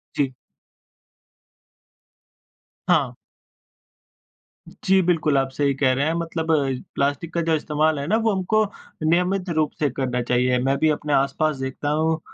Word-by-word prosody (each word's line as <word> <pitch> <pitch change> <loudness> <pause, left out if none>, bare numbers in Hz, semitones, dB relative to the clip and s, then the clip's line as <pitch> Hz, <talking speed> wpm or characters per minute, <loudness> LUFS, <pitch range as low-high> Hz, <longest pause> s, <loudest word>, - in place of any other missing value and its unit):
जी। 135 -2 0 2.6
हाँ। 145 -8 +3 1.6
जी, 190 0 +2
बिल्कुल। 160 -5 +2
आप 135 0 +1
सही 140 0 +1
कह 135 -1 +2
रहे 140 +2 0
हैं, 160 - +1
मतलब 165 -1 -2
अ, - - +5 0.4
प्लास्टिक 145 +4 -1
का 170 - 0
जो 160 - +3
इस्तेमाल 155 0 0
है 140 - -3
ना 215 +4 +2
वो 220 - +4
हमको 215 +4 +2 0.4
नियमित 180 +3 +1
रूप 155 -2 +2
से 150 - +2
करना 125 -2 -1
चाहिए। 125 +1 +1
मैं 135 +1 +1
भी 155 - +3
अपने 150 -1 -1
आस-पास 140 +3 +1
देखता 130 +2 -4
हूँ 160 +2 +1
150 Hz, 145 wpm, -23 LUFS, 135-165 Hz, 2.6 s, अ